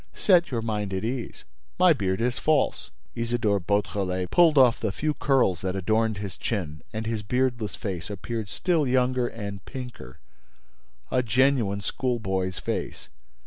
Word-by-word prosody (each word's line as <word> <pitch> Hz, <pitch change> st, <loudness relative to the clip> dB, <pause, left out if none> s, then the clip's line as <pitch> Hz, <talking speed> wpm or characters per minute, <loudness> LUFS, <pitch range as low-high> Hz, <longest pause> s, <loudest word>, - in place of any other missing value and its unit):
Set 180 Hz, -4 st, +4 dB
your 115 Hz, -3 st, -2 dB
mind 105 Hz, -3 st, -2 dB
at 95 Hz, -, -2 dB
ease: 120 Hz, +1 st, -4 dB, 0.3 s
my 180 Hz, -2 st, +6 dB
beard 95 Hz, -8 st, -1 dB
is 120 Hz, +1 st, 0 dB
false!" 155 Hz, -2 st, +1 dB, 0.2 s
Isidore 115 Hz, -3 st, 0 dB
Beautrelet 95 Hz, -1 st, -1 dB
pulled 165 Hz, -4 st, +5 dB
off 125 Hz, -3 st, +6 dB
the 110 Hz, -, -1 dB
few 150 Hz, +11 st, -1 dB
curls 125 Hz, -, +2 dB
that 95 Hz, 0 st, -2 dB
adorned 110 Hz, +3 st, +1 dB
his 100 Hz, -2 st, -6 dB
chin, 80 Hz, -9 st, -3 dB
and 110 Hz, 0 st, -4 dB
his 110 Hz, -1 st, -2 dB
beardless 120 Hz, 0 st, -1 dB
face 90 Hz, -6 st, -5 dB
appeared 110 Hz, +2 st, -4 dB
still 165 Hz, -, 0 dB
younger 125 Hz, -1 st, +2 dB
and 100 Hz, -4 st, -6 dB
pinker, 125 Hz, -2 st, -8 dB, 0.9 s
a 125 Hz, -, +3 dB
genuine 120 Hz, -4 st, +2 dB
schoolboy's 95 Hz, -6 st, -2 dB
face. 85 Hz, -, -4 dB
110 Hz, 145 wpm, -26 LUFS, 100-130 Hz, 0.9 s, my